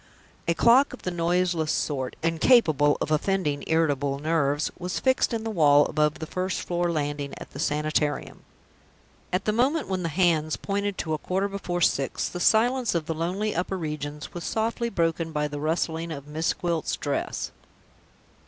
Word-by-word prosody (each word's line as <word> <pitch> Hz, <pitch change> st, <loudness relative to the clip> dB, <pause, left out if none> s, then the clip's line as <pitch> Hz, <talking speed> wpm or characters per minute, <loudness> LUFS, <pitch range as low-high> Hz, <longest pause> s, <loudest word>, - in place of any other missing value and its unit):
A 170 Hz, -, +2 dB
clock 250 Hz, -, +5 dB
of 255 Hz, -, -10 dB
the 180 Hz, -, -2 dB
noiseless 175 Hz, -1 st, +1 dB
sort 130 Hz, -4 st, -2 dB
incapable 165 Hz, -, +4 dB
of -, -, -2 dB
offending 155 Hz, -2 st, 0 dB
irritable 145 Hz, -4 st, +1 dB
nerves 145 Hz, -1 st, 0 dB
was 180 Hz, 0 st, -3 dB
fixed 260 Hz, 0 st, +2 dB
in 225 Hz, -2 st, -2 dB
the 225 Hz, -, -3 dB
wall, 145 Hz, -6 st, +5 dB
above 150 Hz, 0 st, +1 dB
the 160 Hz, -, -5 dB
first 185 Hz, +3 st, -2 dB
floor 175 Hz, 0 st, 0 dB
landing, 145 Hz, -2 st, -3 dB
at -, -, -10 dB
the 140 Hz, -, -9 dB
Sanitarium. 150 Hz, -1 st, -1 dB, 0.9 s
At 180 Hz, -, -1 dB
the 215 Hz, -, +2 dB
moment 265 Hz, +8 st, +1 dB
when 185 Hz, -1 st, -1 dB
the 170 Hz, -, -1 dB
hands 160 Hz, -2 st, +2 dB
pointed 200 Hz, 0 st, -2 dB
to 160 Hz, -, -2 dB
a 155 Hz, -, -1 dB
quarter 190 Hz, +5 st, -1 dB
before 190 Hz, -3 st, -3 dB
six, 135 Hz, -4 st, +1 dB
the 175 Hz, -, -6 dB
silence 235 Hz, +4 st, +3 dB
of 165 Hz, -2 st, 0 dB
the 160 Hz, -, -2 dB
lonely 185 Hz, +7 st, -2 dB
upper 185 Hz, +2 st, -2 dB
regions 150 Hz, -2 st, -5 dB
was 175 Hz, -, -6 dB
softly 230 Hz, +4 st, -1 dB
broken 165 Hz, -4 st, 0 dB
by 150 Hz, -1 st, 0 dB
the 145 Hz, 0 st, -6 dB
rustling 165 Hz, +1 st, -1 dB
of 140 Hz, -3 st, -6 dB
Miss 155 Hz, +2 st, -1 dB
Gwilt's 170 Hz, -3 st, -1 dB
dress. -, -, -3 dB
165 Hz, 170 wpm, -26 LUFS, 150-190 Hz, 0.9 s, clock